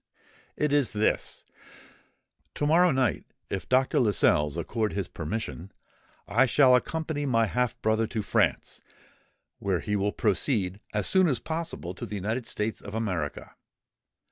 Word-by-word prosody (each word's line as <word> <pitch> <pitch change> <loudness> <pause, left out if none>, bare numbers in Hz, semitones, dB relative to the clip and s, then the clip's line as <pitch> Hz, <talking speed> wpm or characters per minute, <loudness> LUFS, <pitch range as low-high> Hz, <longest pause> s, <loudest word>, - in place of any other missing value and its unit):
It 150 -1 +1
is 145 -5 +2
this: 105 +1 0 1.1
To 145 - -1
morrow 170 +4 +5
night, 130 -4 +1 0.3
if 95 - -4
Dr. 130 +1 +3
Lascelles 75 - +2
accord 110 -2 -2
his 100 -3 -2
permission, 90 +2 -5 0.6
I 120 +6 +3
shall 130 +1 +5
accompany 155 +2 -1
my 115 -3 +3
half 125 +2 -1
brother 110 +1 +2
to 110 -1 -3
France, - - 0 0.8
whence 95 -3 -1
he 105 - 0
will 100 +1 +1
proceed 100 -3 0
as 105 -2 -1
soon 185 -1 +4
as 135 -6 +1
possible 160 - -4
to - - -7
the 105 - -6
United 110 +5 -3
States 105 +1 -3
of 100 +1 -8
America. 90 -10 -3
110 Hz, 145 wpm, -27 LUFS, 100-130 Hz, 1.1 s, morrow